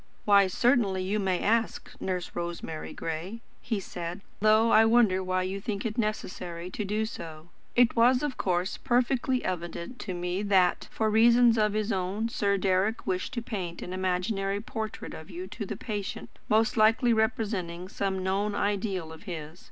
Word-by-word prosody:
"Why 200 -2 +6
certainly 200 -2 +2
you 200 +3 0
may 190 -3 0
ask, 225 +1 0
Nurse 180 -2 -2
Rosemary 170 -2 -5
Gray," 170 +8 -5 0.2
he 220 -4 -2
said, 175 0 -6 0.2
"though 215 +2 +4
I 220 +1 +7
wonder 225 -5 +4 0.2
you 190 +2 -3
think 205 -1 -3
it 215 -2 -2
necessary 180 -5 -3
to 210 - -3
do 210 +2 -1
so. 160 -6 -8 0.3
It 245 -1 +4
was 250 +3 +4
of 290 -3 -1
course 180 0 -1
perfectly 255 0 +1
evident 175 +5 -4
to 185 -3 -4
me 180 +2 -2
that, 190 -3 +2
for 220 -1 0
reasons 235 +1 +6
of 210 -2 +2
his 215 +1 -1
own, 195 +4 -1
Sir 200 -3 +1
Deryck 190 +3 +1
wished 185 0 -2
to 235 - -2
paint 185 -8 -5
an 180 - -6
imaginary 195 +2 -1
portrait 220 0 -5
of 160 +3 -10
you 180 0 -6
to 205 -1 -6
the - - -5
patient, 205 -4 -5 0.2
most 220 +2 +3
likely 225 +2 +4
representing 200 -6 -1
some 190 -1 -2
known 200 +2 0
ideal 195 -6 -1
of 160 - -13
his. 160 0 -6
200 Hz, 165 wpm, -28 LUFS, 180-220 Hz, 0.3 s, I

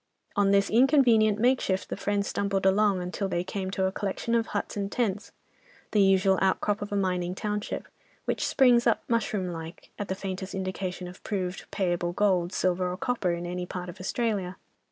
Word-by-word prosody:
On 200 -1 +3
this 200 0 +3
inconvenient 235 -4 +5
makeshift 235 -5 +1
the - - -2
friends 200 0 -1
stumbled 200 -1 -1
along 195 -1 +3
until 190 +2 -3
they 175 -1 -1
came 190 0 -4
to 190 0 0
a 190 - +1
collection 205 +4 -3
of 230 -1 +2
huts 205 - -3
and 200 -1 -3
tents, 210 -4 -1 0.6
the 210 - +4
usual 195 -1 +4
outcrop 205 +2 +1
of 205 - -5
a - - -1
mining 180 -2 0
township, 210 0 -3 0.4
which - - -1
springs 245 -2 +4
up, 230 - +2
mushroom 215 -5 0
like, 165 0 -9
at 205 - -3
the 190 - -2
faintest 190 0 -5
indication 185 -1 -4
of 180 +1 -12
proved, 190 -3 -3
payable 175 -3 -1
gold, 185 -3 +2
silver 180 -1 0
or 180 - -4
copper 205 -7 0
in 170 0 -4
any 180 0 -4
part 180 0 -5
of 180 +2 -10
Australia. 190 -2 -1
195 Hz, 185 wpm, -27 LUFS, 185-210 Hz, 0.6 s, inconvenient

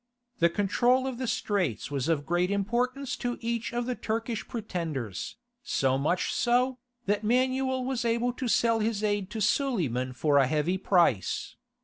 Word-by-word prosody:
The 170 - +5
control 240 +8 +2
of 260 -2 -4
the 255 - -2
Straits 185 - -1
was 140 -1 -1
of 155 -3 +1
great 175 +3 +1
importance 240 +7 -1
to 245 0 -2
each 235 0 -2
of 240 0 -2
the 250 - -1
Turkish 225 -1 -3
pretenders, 165 - -4 0.3
so 135 - +1
much 175 +6 0
so, 250 +2 +2 0.3
that 205 +1 0
Manuel 260 +2 +1
was 260 -1 -1
able 235 +1 +1
to 250 +1 -4
sell 230 0 +3
his 215 -1 -1
aid 205 -2 0
to 220 - -5
Suleiman 180 - 0
for 145 +3 +3
a 135 - +4
heavy 155 +6 0
price. 170 - +1
215 Hz, 160 wpm, -28 LUFS, 170-245 Hz, 0.3 s, The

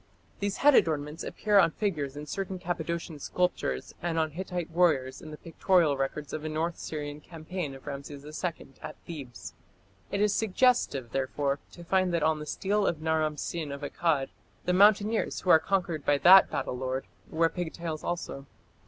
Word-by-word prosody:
These 200 -1 -2
head 290 - +8
adornments 150 - +1
appear 210 -1 +2
on 170 - +5
figures 150 -7 -3
in 150 - -6
certain 190 +4 -4
Cappadocian 170 -3 -4
sculptures 160 - -1
and 170 -1 -2
on 160 -1 +1
Hittite 175 0 -4
warriors 155 -7 +2
in 155 - -9
the 150 - -8
pictorial 165 -2 +2
records 135 +1 -3
of 155 - -4
a 155 - -3
north 160 +2 -1
Syrian 150 -1 -5
campaign 165 -2 -6
of 135 - -14
Rameses 140 0 -7
II 155 +1 -5
at - - -7
Thebes. 140 -8 -8 0.6
It 200 - -1
is 210 0 +3
suggestive, 205 - +2
therefore, 140 +1 -1
to 175 - -11
find 185 +1 +2
that 165 - 0
on 155 -1 +2
the 150 - -7
stele 200 +4 0
of 165 - -1
Naram 155 -1 0
Sin 155 -1 -4
of 140 +1 -6
Akkad, 145 -2 0 0.4
the 180 - +1
mountaineers 210 +3 +3
who 185 - +3
are 160 - +8
conquered 175 -4 -1
by 145 - +3
that 190 +6 +8
battle - - -3
lord 130 +1 -3 0.2
wear 165 +1 +2
pigtails 165 -2 -5
also. 155 -5 -4
160 Hz, 175 wpm, -29 LUFS, 145-180 Hz, 0.6 s, head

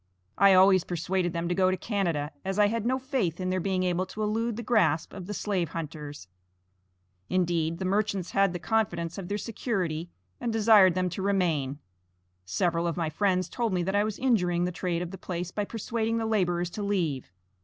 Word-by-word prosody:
I 195 0 +6
always 185 -1 +6
persuaded 175 +1 -1
them 170 0 -2
to 175 - 0
go 185 0 +3
to 185 - 0
Canada, 170 -10 -1
as 195 +1 -3
I 205 -1 +5
had 230 0 -1
no 260 +1 +2
faith 260 - -2
in 185 0 -1
their 185 - 0
being 185 0 0
able 180 +1 0
to 215 - -5
elude 225 +2 -1
the 235 - -5
grasp 210 -9 +2
of 185 -3 -8
the 210 - -4
slave 185 -6 -1
hunters. 150 - -7 1.0
Indeed, 170 -3 0
the 190 - -4
merchants 200 -1 0
had 195 -1 +3
the 175 - -3
confidence 175 -4 -1
of 180 - -6
their 205 - -2
security 185 -8 -3 0.3
and 235 - -2
desired 210 -5 +6
them 185 0 +1
to 190 - -4
remain; 170 -9 0 0.7
several 165 - 0
of 170 - -2
my 165 -3 -1
friends 185 +1 +1
told 230 +1 -2
me 180 -1 +1
that 190 +3 -1
I 205 - +4
was 215 -1 -3
injuring 180 -9 +2
the 180 - -1
trade 175 -1 -2
of 175 - -6
the 190 - -8
place 175 -1 -4
by 205 +1 -2
persuading 225 +1 -2
the 225 - -1
laborers 175 -5 0
to 210 - -5
leave. 170 - -1
185 Hz, 205 wpm, -28 LUFS, 170-210 Hz, 1.0 s, I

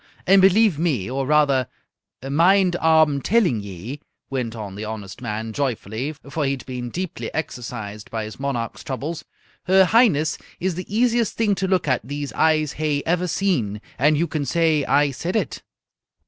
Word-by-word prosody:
And 195 +1 +6
believe 195 -3 +4
me, 130 - 0
or 135 0 -2
rather, 140 -4 +3 0.6
mind 175 +5 +4
ah'm 160 -4 +3
telling 185 - +2
ye," 100 +8 -7 0.3
went 125 -4 -2
on 105 -3 -6
the 105 +2 -6
honest 105 -2 -7
man, 110 -1 -4
joyfully, 130 0 -2
for 150 +2 -2
he 135 0 +1
had 130 -4 -7
been 125 -2 -5
deeply 185 +5 -5
exercised 110 -8 -5
by 110 -1 -3
his 110 +3 -8
monarch's 130 -5 -3
troubles, 150 +5 -4 0.4
"her 190 +1 +5
Highness 180 - +3 0.2
is 185 +1 0
the 185 +3 -7
easiest 235 +1 +1
thing 220 -3 +2
to 195 0 -1
look 185 -4 +1
at 130 -2 +2
these 145 +3 -5
eyes 155 -2 +2
hae 150 -2 0
ever 180 +2 +1
seen. 155 - 0 0.2
And 150 +3 +4
you 165 - +2
can 155 -2 -3
say 155 +1 +2
I 145 0 +3
said 170 - -4
it!" 220 - -1
145 Hz, 170 wpm, -22 LUFS, 120-175 Hz, 0.6 s, And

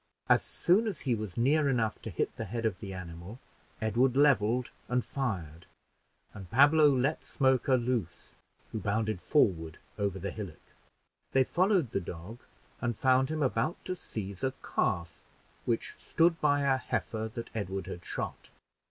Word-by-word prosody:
As - - +5
soon 200 +6 +2
as 210 - -3
he 130 - +1
was 105 -5 -4
near 140 +5 +3
enough 115 -5 0
to - - -6
hit - - -2
the 115 - -4
head 115 +3 -3
of 105 -5 0
the 100 -3 -6
animal, 90 +3 -8 0.4
Edward 120 +4 +2
leveled 125 -4 +3 0.2
and 125 0 0
fired, 90 - -4 0.7
and 95 -4 -10
Pablo 145 +5 +6
let 135 +3 +1
Smoker 130 -1 +2
loose, 120 -8 -3 0.4
who 110 - -3
bounded 110 -2 -1
forward 85 - +2 0.2
over 100 -2 0
the 100 0 -4
hillock. 100 -7 -9 0.6
They 135 - +5
followed 180 - +2
the 100 - 0
dog 90 +7 -8 0.4
and 120 -3 -1
found 130 0 +3
him 155 -1 -1
about 130 +4 0
to 185 - -2
seize 100 - -6
a 130 0 0
calf 85 -2 -1 0.5
which 115 -2 -1
stood 165 0 +2
by 145 -1 +3
a 135 -1 +3
heifer 110 -3 -3
that 115 - -6
Edward 95 -2 -3
had 85 - -7
shot. - - -5
115 Hz, 160 wpm, -30 LUFS, 100-135 Hz, 0.7 s, Pablo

